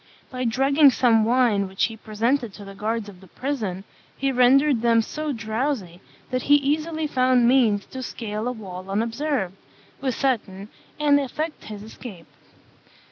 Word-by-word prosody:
By 255 Hz, -1 st, -3 dB
drugging 275 Hz, +5 st, +5 dB
some 230 Hz, -4 st, +3 dB
wine 230 Hz, -5 st, +2 dB
which 190 Hz, 0 st, -3 dB
he 225 Hz, -, 0 dB
presented 225 Hz, +2 st, -1 dB
to 205 Hz, -, -10 dB
the 195 Hz, -, -9 dB
guards 215 Hz, +2 st, -3 dB
of 195 Hz, -3 st, -13 dB
the 190 Hz, -, -15 dB
prison, 215 Hz, -6 st, -4 dB, 0.3 s
he 275 Hz, 0 st, 0 dB
rendered 260 Hz, +1 st, +4 dB
them 230 Hz, -1 st, +3 dB
so 305 Hz, +5 st, -4 dB
drowsy 220 Hz, -5 st, -3 dB, 0.3 s
that 255 Hz, 0 st, 0 dB
he 290 Hz, -, +5 dB
easily 310 Hz, +3 st, 0 dB
found 255 Hz, -4 st, +3 dB
means 230 Hz, -6 st, +3 dB
to 260 Hz, -, -8 dB
scale 220 Hz, -2 st, -4 dB
a -, -, 0 dB
wall 190 Hz, -5 st, -8 dB
unobserved, 230 Hz, 0 st, -1 dB, 0.5 s
with 260 Hz, -3 st, -2 dB
Seton, 210 Hz, -7 st, -2 dB, 0.3 s
and 290 Hz, -1 st, +4 dB
effect 300 Hz, +4 st, -4 dB
his 210 Hz, -1 st, -8 dB
escape. 215 Hz, -5 st, -10 dB
235 Hz, 155 wpm, -24 LUFS, 210-275 Hz, 0.5 s, drugging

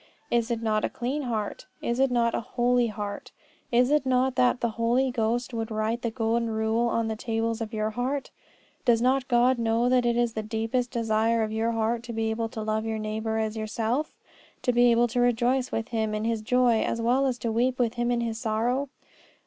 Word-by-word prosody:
Is 235 Hz, 0 st, +1 dB
it 230 Hz, -1 st, -2 dB
not 215 Hz, -1 st, +1 dB
a -, -, +1 dB
clean 260 Hz, +5 st, -3 dB
heart? 225 Hz, -6 st, -3 dB
Is 235 Hz, +1 st, -2 dB
it 270 Hz, 0 st, +4 dB
not 235 Hz, -1 st, +1 dB
a -, -, 0 dB
holy 245 Hz, +1 st, +1 dB
heart? 205 Hz, -2 st, -5 dB, 0.4 s
Is 245 Hz, +2 st, +3 dB
it 300 Hz, -1 st, +3 dB
not 260 Hz, 0 st, +2 dB
that 250 Hz, 0 st, +2 dB
the 235 Hz, -, 0 dB
Holy 250 Hz, +3 st, +2 dB
Ghost 240 Hz, +1 st, -1 dB
would 225 Hz, 0 st, -3 dB
write 220 Hz, +2 st, -1 dB
the 235 Hz, -, -1 dB
golden 230 Hz, 0 st, 0 dB
rule 220 Hz, +2 st, +1 dB
on 230 Hz, -1 st, 0 dB
the 220 Hz, -, -2 dB
tables 225 Hz, +1 st, -2 dB
of 220 Hz, -1 st, -4 dB
your 215 Hz, -1 st, -1 dB
heart? 260 Hz, +5 st, -2 dB, 0.5 s
Does 235 Hz, -4 st, +4 dB
not 260 Hz, +2 st, +2 dB
God 245 Hz, 0 st, +3 dB
know 230 Hz, +1 st, +2 dB
that 250 Hz, -1 st, +3 dB
it 240 Hz, 0 st, +1 dB
is 240 Hz, -1 st, +1 dB
the 220 Hz, -, -2 dB
deepest 225 Hz, +3 st, -1 dB
desire 225 Hz, -1 st, +1 dB
of 215 Hz, -, -3 dB
your 225 Hz, +1 st, 0 dB
heart 225 Hz, +1 st, 0 dB
to 235 Hz, -, -6 dB
be 225 Hz, 0 st, -1 dB
able 225 Hz, 0 st, -2 dB
to 220 Hz, -1 st, -5 dB
love 215 Hz, 0 st, -1 dB
your 220 Hz, 0 st, -2 dB
neighbour 220 Hz, +1 st, -2 dB
as 220 Hz, 0 st, -1 dB
yourself? 225 Hz, +6 st, -2 dB, 0.5 s
To 250 Hz, -, +2 dB
be 240 Hz, 0 st, +5 dB
able 235 Hz, +1 st, +4 dB
to 245 Hz, +2 st, -2 dB
rejoice 245 Hz, +2 st, +1 dB
with 225 Hz, +2 st, -3 dB
him 220 Hz, -2 st, -1 dB
in 210 Hz, -, -2 dB
his 225 Hz, -1 st, -1 dB
joy 245 Hz, 0 st, +3 dB
as 230 Hz, -, -1 dB
well 250 Hz, +4 st, +2 dB
as 250 Hz, -2 st, -1 dB
to 230 Hz, -1 st, -2 dB
weep 245 Hz, +3 st, +1 dB
with 235 Hz, -2 st, +1 dB
him 240 Hz, 0 st, -1 dB
in 240 Hz, -1 st, +1 dB
his 230 Hz, -1 st, -3 dB
sorrow? 240 Hz, +6 st, 0 dB
230 Hz, 220 wpm, -26 LUFS, 220-245 Hz, 0.5 s, be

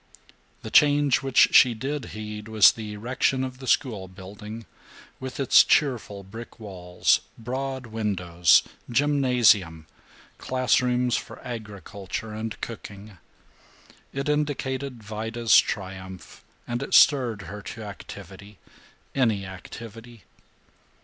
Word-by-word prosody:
The 110 Hz, -, -7 dB
change 145 Hz, -2 st, +4 dB
which 135 Hz, -2 st, +4 dB
she 125 Hz, -3 st, +6 dB
did 135 Hz, +5 st, -4 dB
heed 105 Hz, 0 st, -7 dB
was 110 Hz, -2 st, +6 dB
the 110 Hz, -2 st, -7 dB
erection 125 Hz, +4 st, -1 dB
of 130 Hz, -1 st, -6 dB
the 130 Hz, -, -9 dB
schoolbuilding, 105 Hz, 0 st, -3 dB, 0.5 s
with 130 Hz, 0 st, -7 dB
its 135 Hz, -, +6 dB
cheerful 115 Hz, -8 st, 0 dB
brick 115 Hz, +5 st, -11 dB
walls, 90 Hz, -4 st, 0 dB, 0.2 s
broad 130 Hz, +2 st, -4 dB
windows, 95 Hz, -7 st, +2 dB, 0.3 s
gymnasium, 120 Hz, -, +2 dB, 0.5 s
classrooms 125 Hz, -1 st, +1 dB
for -, -, -8 dB
agriculture 105 Hz, -2 st, -7 dB
and 110 Hz, 0 st, -5 dB
cooking. 105 Hz, -3 st, -9 dB, 0.9 s
It 135 Hz, +1 st, -4 dB
indicated 140 Hz, -4 st, -2 dB
Vida's 110 Hz, +2 st, 0 dB
triumph, 95 Hz, -1 st, -6 dB, 0.2 s
and 120 Hz, +1 st, -3 dB
it 135 Hz, -, 0 dB
stirred 120 Hz, -8 st, +4 dB
her 100 Hz, +4 st, -8 dB
to 110 Hz, +2 st, -8 dB
activity 100 Hz, 0 st, -11 dB, 0.6 s
any 110 Hz, -7 st, +1 dB
activity. 115 Hz, +4 st, -11 dB
115 Hz, 105 wpm, -25 LUFS, 100-130 Hz, 0.9 s, she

